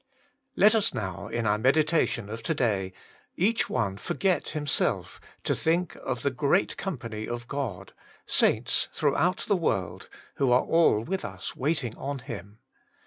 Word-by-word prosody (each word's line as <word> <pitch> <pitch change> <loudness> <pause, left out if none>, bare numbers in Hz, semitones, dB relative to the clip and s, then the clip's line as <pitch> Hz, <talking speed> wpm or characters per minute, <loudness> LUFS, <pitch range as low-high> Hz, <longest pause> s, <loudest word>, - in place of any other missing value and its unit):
LET 210 +3 +6
us 220 -3 +2
now, 100 -1 -4
in 115 +1 -2
our 105 0 +2
meditation 140 -3 +2
of 110 +2 -6
to 155 +8 -1
day, 100 -8 0 0.4
each 225 +6 +2
one 100 -4 -1
forget 185 - 0
himself, 150 -3 -1 0.2
to - - +1
think 170 +1 0
of 125 - -4
the 140 - +2
great 145 +8 +1
company 115 - -5
of 120 0 -5
God, 135 -5 -4 0.3
saints - - +2
throughout 160 +5 +1
the 205 - +3
world, 100 - -2 0.3
who 135 -3 +2
are 125 - +5
all 165 -10 +4
with 190 +8 -3
us 95 -3 -6
waiting 130 -4 -1
on 140 +1 -4
Him. 105 -6 -8
130 Hz, 150 wpm, -27 LUFS, 110-165 Hz, 0.4 s, LET